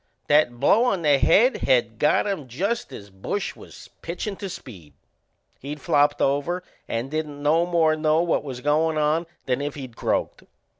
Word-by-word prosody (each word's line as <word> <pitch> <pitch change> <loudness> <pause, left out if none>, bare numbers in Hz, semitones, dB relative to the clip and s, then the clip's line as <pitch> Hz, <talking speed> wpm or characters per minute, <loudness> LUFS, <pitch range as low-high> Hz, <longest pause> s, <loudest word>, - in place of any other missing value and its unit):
That 145 -5 +3
blow 230 - +4
on 195 -8 0
the 145 -2 +4
head 245 - +4
had 120 -4 +1
got 150 - +3
him 195 -9 -3
just 195 - -2
as 100 -1 -10
Bush 135 - -4
was - - -13
pitchin' 180 +4 -4
to 195 - -6
Speed. 90 - -11 0.7
He'd 145 +2 -7
flopped 145 -2 +2
over 145 +7 0 0.2
and 120 +4 -3
didn't 150 -2 -4
no 165 +4 +3
more 165 -3 +3
know 155 +1 +2
what 170 - 0
was 130 -4 -7
goin' 155 +2 +1
on 155 +3 +1 0.2
than 130 +1 -1
if 145 0 -4
he'd 130 -5 -8
croaked. - - -2
150 Hz, 170 wpm, -24 LUFS, 135-170 Hz, 0.7 s, blow